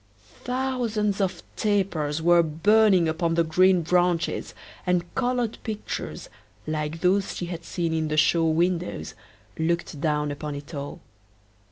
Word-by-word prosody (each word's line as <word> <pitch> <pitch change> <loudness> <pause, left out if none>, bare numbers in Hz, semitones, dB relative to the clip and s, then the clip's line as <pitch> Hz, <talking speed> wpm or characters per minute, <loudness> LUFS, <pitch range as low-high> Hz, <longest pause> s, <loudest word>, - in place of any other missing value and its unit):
Thousands 245 -6 -1
of 190 -2 -1
tapers 175 -8 0
were 175 0 +6
burning 185 +3 +4
upon 165 +1 0
the 170 - +3
green 180 +2 +4
branches, 175 0 +1 0.3
and 180 -1 0
colored 245 -2 -1
pictures, 215 -2 -5 0.4
like 155 +1 -3
those 190 +2 +2
she 175 - -3
had 170 -1 -6
seen 170 -1 -2
in 160 -1 0
the 155 0 -2
show 165 +1 +4
windows, 170 - 0 0.5
looked 160 -3 -1
down 150 -2 0
upon 145 0 -5
it 145 +3 -9
all. 140 -1 -6
170 Hz, 135 wpm, -25 LUFS, 160-195 Hz, 0.5 s, were